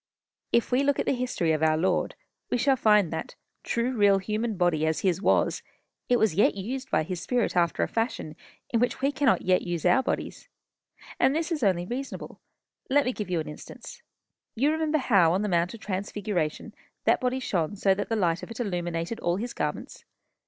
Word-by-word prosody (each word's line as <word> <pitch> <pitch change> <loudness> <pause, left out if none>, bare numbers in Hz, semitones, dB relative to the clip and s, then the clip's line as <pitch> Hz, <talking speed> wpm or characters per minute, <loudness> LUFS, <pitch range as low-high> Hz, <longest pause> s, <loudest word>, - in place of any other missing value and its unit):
If 235 - +2
we 250 +2 +3
look 280 0 +2
at - - -1
the - - +2
history 245 -10 -1
of 155 -1 0
our 155 0 +3
Lord, 180 +4 0 0.3
we - - +1
shall 270 +2 +3
find 210 -8 +3
that, 160 - -5 0.3
true 240 +2 -1
real 205 -3 +5
human 215 +2 -2
body 175 -4 +2
as 160 - 0
his 185 -1 +1
was, - - +2 0.5
it 245 - +4
was 220 -6 +2
yet 200 +3 +3
used 255 +7 -5
by 155 - +2
his 175 +2 -5
spirit 245 +3 0
after 170 -1 +2
a - - 0
fashion 225 -9 -3 0.4
in 230 - +2
which 245 +2 0
we 275 +1 +2
cannot 280 -3 +2
yet 185 0 +3
use 175 -3 -4
our 265 - +5
bodies. - - -4 0.7
And 270 - +3
this 325 +2 -1
is 315 -4 -1
only 185 -5 +2
reasonable. 255 +7 -6 0.5
Let 285 +1 +3
me 255 - 0
give 210 -5 -5
you 175 -2 0
an - - -8
instance. 150 - -10 0.5
You 275 +6 +2
remember 315 -1 +1
how, 195 - +4
on 195 +3 0
the 210 - -1
Mount 175 +3 +1
of - - -12
Transfiguration, 195 -5 -3 0.3
that - - +3
body 255 +1 0
shone 185 -6 -1
so 195 -1 +3
that 205 +2 -4
the 225 - +1
light 170 -5 +1
of - - -8
it 230 - -8
illuminated 175 -1 -3
all 175 0 0
his 235 +5 -4
garments. - - -4
205 Hz, 205 wpm, -27 LUFS, 175-250 Hz, 0.7 s, real